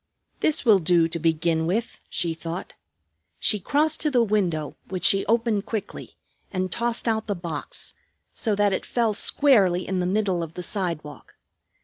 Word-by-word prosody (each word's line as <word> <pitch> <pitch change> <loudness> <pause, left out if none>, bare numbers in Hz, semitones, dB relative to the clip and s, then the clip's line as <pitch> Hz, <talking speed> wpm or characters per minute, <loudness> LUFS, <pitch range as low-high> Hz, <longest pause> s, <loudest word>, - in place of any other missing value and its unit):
"This 310 -2 +2
will 215 -4 +6
do 170 -1 +3
to 165 0 -4
begin 160 0 +1
with," 220 +7 -2
she 170 -1 -1
thought. 165 +3 -6 0.6
She 210 - +1
crossed 300 - +1
to 305 - +2
the 245 -4 +3
window, 180 -9 -1
which 185 -1 -5
she 195 0 +4
opened 225 -2 +1
quickly, 210 -3 -6 0.3
and 185 -1 -2
tossed 235 +2 -1
out 220 -1 0
the 205 - -1
box, 170 -4 -5 0.4
so 220 -3 +1
that 205 -1 +2
it - - -2
fell 230 -3 0
squarely 200 -7 +3
in 190 -1 -1
the 180 - 0
middle 190 -2 0
of 165 -1 -6
the 180 - -5
sidewalk. 165 -8 -4
190 Hz, 165 wpm, -24 LUFS, 170-220 Hz, 0.6 s, will